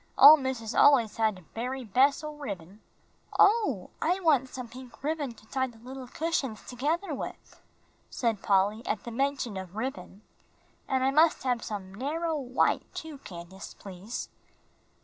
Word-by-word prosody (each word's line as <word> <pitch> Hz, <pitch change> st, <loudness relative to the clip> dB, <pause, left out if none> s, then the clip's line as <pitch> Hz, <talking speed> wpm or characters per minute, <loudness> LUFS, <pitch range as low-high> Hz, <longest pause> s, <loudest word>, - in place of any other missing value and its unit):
Ole 300 Hz, +3 st, +11 dB
missus 260 Hz, -5 st, -3 dB
al'ays 240 Hz, -7 st, +5 dB
had 220 Hz, -2 st, +2 dB
de 185 Hz, -, -13 dB
bery 255 Hz, +3 st, -3 dB
bes' 260 Hz, +8 st, +3 dB
o' 305 Hz, 0 st, -5 dB
ribbin." 200 Hz, -, -7 dB, 0.6 s
"Oh, 400 Hz, -, +3 dB
I 360 Hz, +4 st, +2 dB
want 280 Hz, -7 st, +3 dB
some 255 Hz, -2 st, -7 dB
pink 250 Hz, 0 st, -12 dB
ribbon 290 Hz, -5 st, -2 dB
to 215 Hz, -, -18 dB
tie 260 Hz, +3 st, -1 dB
the 240 Hz, -3 st, -14 dB
little 255 Hz, +2 st, -9 dB
cushions 275 Hz, -6 st, -2 dB
together 305 Hz, +8 st, -1 dB
with," 270 Hz, -, -8 dB, 0.5 s
said 225 Hz, -5 st, -1 dB
Polly, 205 Hz, +3 st, +2 dB
at 210 Hz, -, -1 dB
the 235 Hz, -, -6 dB
mention 265 Hz, -4 st, -1 dB
of 190 Hz, 0 st, -7 dB
ribbon. 215 Hz, -4 st, -5 dB, 0.6 s
"And 260 Hz, -1 st, +1 dB
I 265 Hz, -, +3 dB
must 310 Hz, +3 st, +4 dB
have 245 Hz, -3 st, 0 dB
some 195 Hz, -3 st, -6 dB
narrow 315 Hz, +8 st, -2 dB
white, 260 Hz, -3 st, 0 dB
too, 315 Hz, -3 st, -7 dB
Candace, 185 Hz, -2 st, -10 dB
please." 195 Hz, +4 st, -7 dB
255 Hz, 155 wpm, -29 LUFS, 215-285 Hz, 0.6 s, Ole